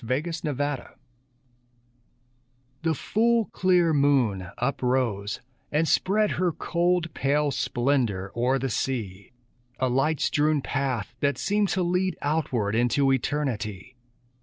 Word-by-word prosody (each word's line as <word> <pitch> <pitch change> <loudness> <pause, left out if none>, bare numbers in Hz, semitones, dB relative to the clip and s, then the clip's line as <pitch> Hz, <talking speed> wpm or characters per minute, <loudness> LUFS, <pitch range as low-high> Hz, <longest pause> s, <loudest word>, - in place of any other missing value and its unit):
THE 155 +8 -2
MOON 145 - -1
PATH 145 0 -3 1.9
The 160 -1 +1
full, 230 - +2
clear 180 -3 +3
moon 130 -10 +2
uprose 125 -5 -1 0.3
and 155 +2 +2
spread 210 +5 +2
Her 180 -1 +1
cold, 170 0 0
pale 145 +1 +1
splendor 120 -8 0
o'er 125 +3 +2
the 135 -1 -2
sea; 105 -5 -3 0.5
A 130 - 0
light 135 +5 +1
strewn 150 -1 +1
path 135 -6 -2
that 140 0 +1
seemed 205 -1 +1
to 185 - +2
lead 180 0 0
Outward 135 -9 0
into 125 +4 +2
eternity. 130 -5 -3
140 Hz, 115 wpm, -26 LUFS, 120-160 Hz, 1.9 s, clear